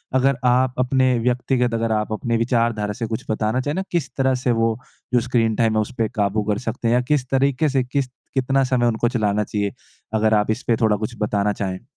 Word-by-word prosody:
अगर 135 Hz, 0 st, +3 dB
आप 125 Hz, +1 st, +3 dB
अपने 130 Hz, 0 st, +2 dB
व्यक्तिगत 125 Hz, 0 st, 0 dB
अगर 115 Hz, 0 st, 0 dB
आप 105 Hz, 0 st, -1 dB
अपने 115 Hz, +1 st, -1 dB
विचारधारा 115 Hz, -3 st, 0 dB
से 115 Hz, -, 0 dB
कुछ 110 Hz, 0 st, -4 dB
बताना 110 Hz, +2 st, 0 dB
चाहे 145 Hz, +3 st, -2 dB
ना 190 Hz, -, -1 dB
किस 165 Hz, -8 st, -1 dB
तरह 130 Hz, -1 st, +2 dB
से 125 Hz, -, +3 dB
वो 115 Hz, -1 st, +1 dB, 0.4 s
जो 125 Hz, -, +5 dB
स्क्रीन 115 Hz, -2 st, +1 dB
टाइम 115 Hz, -1 st, +2 dB
है 110 Hz, -, +3 dB
उस 105 Hz, -, -4 dB
पर 110 Hz, -, +2 dB
काबू 105 Hz, 0 st, +1 dB
कर 105 Hz, -, 0 dB
सकते 115 Hz, +1 st, -2 dB
हैं? 115 Hz, -, +3 dB
या 125 Hz, -, +3 dB
किस 130 Hz, 0 st, 0 dB
तरीके 135 Hz, +2 st, +2 dB
से 135 Hz, -2 st, +1 dB
किस 135 Hz, +2 st, -1 dB, 0.3 s
कितना 135 Hz, 0 st, +2 dB
समय 130 Hz, -2 st, +1 dB
उनको 120 Hz, 0 st, +1 dB
चलाना 105 Hz, -3 st, 0 dB
चाहिए? 100 Hz, -1 st, -2 dB, 0.4 s
अगर 110 Hz, 0 st, +2 dB
आप 105 Hz, 0 st, +2 dB
इसपे 115 Hz, +1 st, 0 dB
थोड़ा 110 Hz, -2 st, +4 dB
कुछ 110 Hz, +3 st, -5 dB
बताना 105 Hz, -1 st, +1 dB
चाहें? 95 Hz, +2 st, -4 dB
120 Hz, 220 wpm, -21 LUFS, 110-130 Hz, 0.4 s, जो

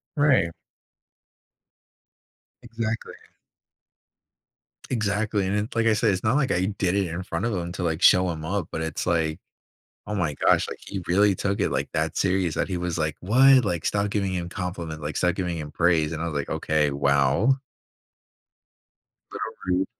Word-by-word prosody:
Right. 140 Hz, -, +3 dB, 2.1 s
Exactly. 115 Hz, -1 st, -4 dB, 1.8 s
Exactly. 105 Hz, -3 st, 0 dB
And 100 Hz, -, 0 dB
it 105 Hz, +2 st, -2 dB
like 115 Hz, 0 st, +2 dB
I 115 Hz, -, +4 dB
said, 110 Hz, 0 st, +2 dB
it's 95 Hz, -1 st, -2 dB
not 115 Hz, +5 st, +2 dB
like 135 Hz, -3 st, +1 dB
I 90 Hz, +1 st, +1 dB
did 100 Hz, -2 st, -1 dB
it 100 Hz, -3 st, +1 dB
in 85 Hz, +3 st, -5 dB
front 105 Hz, -, -3 dB
of 120 Hz, -, -1 dB
him 85 Hz, -1 st, -3 dB
to 95 Hz, -, -4 dB
like 80 Hz, 0 st, -1 dB
show 90 Hz, 0 st, +6 dB
him 80 Hz, -1 st, -6 dB
up, 90 Hz, 0 st, -2 dB
but 80 Hz, -, -3 dB
it's 80 Hz, -1 st, -3 dB
like, 80 Hz, -2 st, 0 dB, 0.7 s
oh 105 Hz, -, -3 dB
my 80 Hz, -7 st, -1 dB
gosh. -, -, +2 dB
Like, -, -, -7 dB
he 100 Hz, -1 st, -4 dB
really 100 Hz, +2 st, +4 dB
took 100 Hz, +2 st, -2 dB
it -, -, +1 dB
like -, -, -1 dB
that -, -, -1 dB
serious 95 Hz, -4 st, +1 dB
that -, -, -1 dB
he 90 Hz, -, -2 dB
was 90 Hz, -1 st, -3 dB
like, 80 Hz, -1 st, -1 dB
why? 130 Hz, +7 st, +6 dB
Like, 85 Hz, -6 st, -2 dB
stop 100 Hz, 0 st, 0 dB
giving 100 Hz, -2 st, -1 dB
him 85 Hz, -1 st, -3 dB
compliment. 90 Hz, -4 st, -5 dB
Like, 75 Hz, +1 st, -4 dB
start 90 Hz, 0 st, +1 dB
giving 90 Hz, -3 st, -2 dB
him 75 Hz, -1 st, -6 dB
praise. 85 Hz, -2 st, +2 dB
And 80 Hz, +1 st, -4 dB
I -, -, -2 dB
was 80 Hz, -, -4 dB
like, 70 Hz, -1 st, -2 dB
okay, 75 Hz, -2 st, +1 dB
wow. 70 Hz, -, +2 dB, 1.8 s
Little -, -, -5 dB, 0.2 s
rude. 95 Hz, -, 0 dB
90 Hz, 180 wpm, -25 LUFS, 80-105 Hz, 2.1 s, show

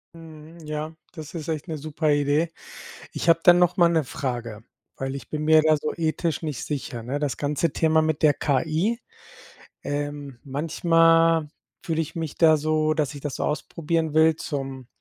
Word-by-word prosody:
Mhm, 160 Hz, 0 st, -13 dB
ja, 155 Hz, +1 st, -4 dB, 0.2 s
das 155 Hz, -4 st, -9 dB
ist 160 Hz, -3 st, -6 dB
echt 155 Hz, -1 st, -3 dB
'ne 160 Hz, -, -3 dB
super 155 Hz, +1 st, -1 dB
Idee. 145 Hz, +3 st, +2 dB, 0.6 s
Ich -, -, -3 dB
habe 165 Hz, 0 st, +5 dB
dann 175 Hz, 0 st, +7 dB
noch 180 Hz, 0 st, +3 dB
mal 175 Hz, -3 st, +5 dB
'ne 165 Hz, -2 st, +1 dB
Frage, 120 Hz, -5 st, -5 dB, 0.3 s
weil 135 Hz, 0 st, -4 dB
ich 140 Hz, -, -10 dB
bin 150 Hz, -1 st, -4 dB
mir 155 Hz, 0 st, +6 dB
da 155 Hz, 0 st, +3 dB
so 150 Hz, +1 st, -3 dB
ethisch 165 Hz, 0 st, -1 dB
nicht 150 Hz, -6 st, -4 dB
sicher, 130 Hz, -5 st, -5 dB
ne? 130 Hz, +5 st, -3 dB
Das 145 Hz, -2 st, -2 dB
ganze 150 Hz, +2 st, -1 dB
Thema 160 Hz, -1 st, +3 dB
mit 155 Hz, -1 st, -1 dB
der 150 Hz, -2 st, +5 dB
KI, 160 Hz, -, 0 dB, 0.8 s
ähm, 145 Hz, -2 st, -4 dB
manchmal 165 Hz, +2 st, +3 dB, 0.4 s
fühle 165 Hz, -3 st, -1 dB
ich 160 Hz, -, -4 dB
mich 160 Hz, -3 st, -5 dB
da 160 Hz, -2 st, +5 dB
so, 155 Hz, +1 st, +1 dB
dass 150 Hz, -2 st, -1 dB
ich 145 Hz, -, -8 dB
das 145 Hz, -2 st, -4 dB
so -, -, -3 dB
ausprobieren 160 Hz, +1 st, -2 dB
will 160 Hz, 0 st, +5 dB
zum 135 Hz, -4 st, -5 dB
155 Hz, 180 wpm, -24 LUFS, 145-165 Hz, 0.8 s, dann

